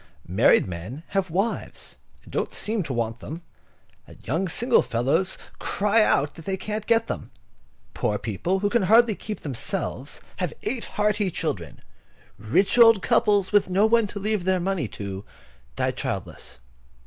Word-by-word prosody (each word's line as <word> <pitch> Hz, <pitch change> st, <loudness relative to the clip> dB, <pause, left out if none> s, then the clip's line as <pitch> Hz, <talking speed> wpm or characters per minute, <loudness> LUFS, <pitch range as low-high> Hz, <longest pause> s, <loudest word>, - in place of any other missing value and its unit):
Married -, -, +4 dB
men 95 Hz, -, -7 dB
have 195 Hz, -2 st, 0 dB
wives, 195 Hz, +7 st, -3 dB, 0.3 s
and -, -, -15 dB
don't -, -, -1 dB
seem 220 Hz, 0 st, -2 dB
to 155 Hz, -, -5 dB
want 115 Hz, -2 st, -2 dB
them; 165 Hz, +3 st, -8 dB, 0.6 s
and -, -, -14 dB
young 165 Hz, +10 st, 0 dB
single 240 Hz, +8 st, +3 dB
fellows 140 Hz, +11 st, 0 dB, 0.2 s
cry 210 Hz, +2 st, +2 dB
out 145 Hz, -8 st, +2 dB
that 165 Hz, -, -12 dB
they 190 Hz, -1 st, -1 dB
can't 215 Hz, +2 st, -5 dB
get 230 Hz, -1 st, +3 dB
them. -, -, -5 dB, 0.6 s
Poor 105 Hz, -, 0 dB
people 170 Hz, -, -2 dB
who 205 Hz, -, +2 dB
can 235 Hz, -, +3 dB
hardly 220 Hz, +4 st, +5 dB
keep 210 Hz, +1 st, -7 dB
themselves 145 Hz, -, -4 dB, 0.2 s
have 180 Hz, -5 st, -2 dB
eight 230 Hz, +2 st, -2 dB
hearty 210 Hz, -1 st, +2 dB
children. -, -, -4 dB, 0.6 s
Rich 190 Hz, -, +2 dB
old 225 Hz, -4 st, +7 dB
couples, 205 Hz, -3 st, +3 dB
with 205 Hz, -2 st, +3 dB
no 195 Hz, +3 st, +3 dB
one 225 Hz, -1 st, +3 dB
to 200 Hz, -, -6 dB
leave 210 Hz, -1 st, -1 dB
their 185 Hz, 0 st, +2 dB
money 180 Hz, -7 st, -1 dB
to, 100 Hz, -1 st, -6 dB, 0.5 s
die -, -, 0 dB
childless. -, -, -5 dB
190 Hz, 160 wpm, -25 LUFS, 145-210 Hz, 0.6 s, old